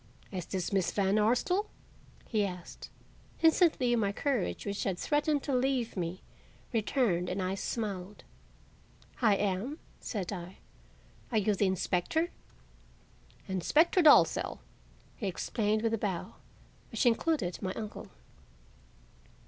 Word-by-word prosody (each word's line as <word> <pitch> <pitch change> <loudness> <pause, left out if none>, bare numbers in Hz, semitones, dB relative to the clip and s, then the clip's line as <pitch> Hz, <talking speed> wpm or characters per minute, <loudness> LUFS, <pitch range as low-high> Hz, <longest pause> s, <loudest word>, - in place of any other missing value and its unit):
"Is 185 -4 -5
this 185 0 -3
Miss 185 -3 +2
Van 200 +1 +2
Arsdale?" 250 - +2 0.6
he 215 -3 +1
asked. 180 -3 -6 0.5
Instantly 320 -7 +4
my 205 -4 +1
courage, 255 0 -1
which 200 0 -2
had 190 -3 -1
threatened 295 - +1
to 280 - -2
leave 255 -2 +1
me, 180 0 -4 0.5
returned 210 -6 +1
and 185 - -2
I 185 0 -1
smiled. 200 -1 -4 1.0
"I 215 -4 +5
am," 205 +9 -1 0.2
said 205 -3 -4
I. 180 0 -7 0.7
"Are 225 - +1
you 210 0 +2
the 200 0 +2
inspector?" 190 - 0 1.2
"Inspector 295 - +3
Dalzell," 310 -3 +5 0.6
he 205 - -3
explained 215 +3 -1
with 225 -1 +1
a 225 - 0
bow, 190 -5 -3 0.6
which - - -1
included 235 - +1
my 185 -1 -2
uncle. 215 -2 -6
210 Hz, 120 wpm, -31 LUFS, 190-250 Hz, 1.2 s, I